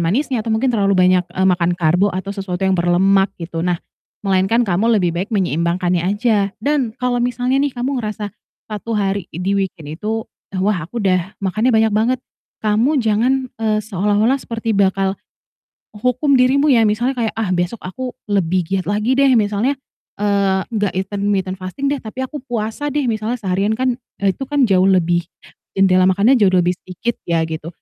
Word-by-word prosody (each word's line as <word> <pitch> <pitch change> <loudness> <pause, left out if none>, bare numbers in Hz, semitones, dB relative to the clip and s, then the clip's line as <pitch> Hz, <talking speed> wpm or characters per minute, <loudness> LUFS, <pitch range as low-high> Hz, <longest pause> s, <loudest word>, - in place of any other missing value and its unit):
manisnya 240 - 0
atau 220 - -6
mungkin 250 +3 +1
terlalu 200 -3 +2
banyak, 180 0 +4
eee, 190 +2 0
makan 175 -1 +2
karbo 175 +3 +2
atau 190 +2 -4
sesuatu 190 -3 -5
yang 190 0 +2
berlemak 190 +3 +3
gitu. 165 -1 -4
Nah, 180 -1 +1 0.5
melainkan 195 +4 +2
kamu 215 +4 +2
lebih 175 -2 +1
baik 190 +4 -2
menyeimbangkannya 175 -1 0
aja 205 0 +1
dan 275 -4 0
kalau 250 -1 0
misalnya 245 +2 0
nih, 285 -1 0
kamu 255 +2 -2
ngerasa 210 -1 -4 0.4
1 215 +2 -4
hari 200 -2 -1
di 180 +5 -2
weekend 165 -6 -4
itu, 220 +1 -2 0.4
"Wah, 190 -5 0
aku 235 +7 -5
udah 185 -1 +1
makannya 215 +6 +1
banyak 220 -1 +3
banget," 230 +5 +1 0.4
kamu 230 +7 +2
jangan, 225 +4 +2 0.3
eee, 215 -1 +1
seolah-olah 210 +5 +1
seperti 230 -1 -3
bakal 195 0 +1 0.8
u 210 - -12
hukum 250 +4 +1
dirimu 275 +4 +3
ya, 230 -2 +5
misalnya 240 +5 0
kayak, 230 -2 -1
"Ah, 225 -3 -1
besok 175 +4 -1
aku 250 +7 -5 0.2
lebih 185 -3 +1
giat 190 -1 -1
lagi 210 +4 +1
deh 275 0 +4
misalnya, 210 +5 +1 0.5
eee, 200 -2 +2 0.2
gak 205 -2 0
intermitten 195 0 -1
fasting 190 +10 -4
deh, - - 0
tapi 220 +4 -7
aku 290 +3 -7
puasa 235 +4 -3
deh 295 0 0
misalnya 220 +2 -1
seharian, 195 +2 0
kan, 255 0 0 0.2
eee, 200 -1 +2
itu 270 - -4
kan 285 -2 +2
jauh 185 -2 +4
lebih 175 -2 +2 0.5
jendela 185 -1 +4
makannya 205 +8 +4
jauh 200 -5 +3
lebih 180 -1 +3
sedikit 185 +6 -3
ya" 170 -1 +2
gitu, 160 0 -5
205 Hz, 175 wpm, -18 LUFS, 185-235 Hz, 0.8 s, ya